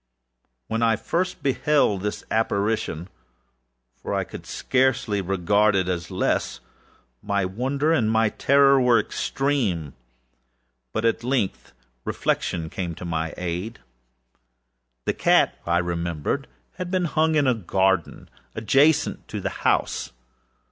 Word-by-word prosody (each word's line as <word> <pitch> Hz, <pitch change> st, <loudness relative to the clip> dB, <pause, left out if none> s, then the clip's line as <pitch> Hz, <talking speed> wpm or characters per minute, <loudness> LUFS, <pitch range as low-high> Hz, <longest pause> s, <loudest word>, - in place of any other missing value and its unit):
When 115 Hz, +1 st, -2 dB
I 115 Hz, -1 st, +4 dB
first 180 Hz, -, -2 dB
beheld 140 Hz, -7 st, +2 dB
this 105 Hz, +1 st, -3 dB
apparitionâfor 100 Hz, -5 st, -1 dB, 1.1 s
I -, -, 0 dB
could -, -, -10 dB
scarcely 125 Hz, -6 st, +1 dB
regard 100 Hz, +3 st, +2 dB
it 95 Hz, -2 st, +1 dB
as 85 Hz, -2 st, -2 dB
lessâmy 95 Hz, +12 st, -3 dB
wonder 135 Hz, -, 0 dB
and 115 Hz, -9 st, +2 dB
my 110 Hz, 0 st, +3 dB
terror 140 Hz, +3 st, +4 dB
were 120 Hz, -2 st, +5 dB
extreme. 110 Hz, -, -1 dB, 1.0 s
But 110 Hz, -, -2 dB
at 115 Hz, 0 st, +1 dB
length 125 Hz, -, -1 dB, 0.3 s
reflection 85 Hz, -2 st, -1 dB
came 85 Hz, 0 st, -4 dB
to 90 Hz, -, -8 dB
my 80 Hz, -1 st, -2 dB
aid. 90 Hz, +6 st, -4 dB, 1.3 s
The -, -, +1 dB
cat, -, -, +3 dB
I 85 Hz, 0 st, +3 dB
remembered, 85 Hz, -3 st, -2 dB, 0.3 s
had 180 Hz, -1 st, -4 dB
been 185 Hz, -1 st, 0 dB
hung 160 Hz, 0 st, +1 dB
in 145 Hz, -2 st, +3 dB
a 130 Hz, -, +4 dB
garden 95 Hz, -4 st, 0 dB, 0.3 s
adjacent 135 Hz, +8 st, +2 dB
to -, -, -5 dB
the -, -, -2 dB
house. -, -, 0 dB
105 Hz, 120 wpm, -24 LUFS, 90-135 Hz, 1.3 s, were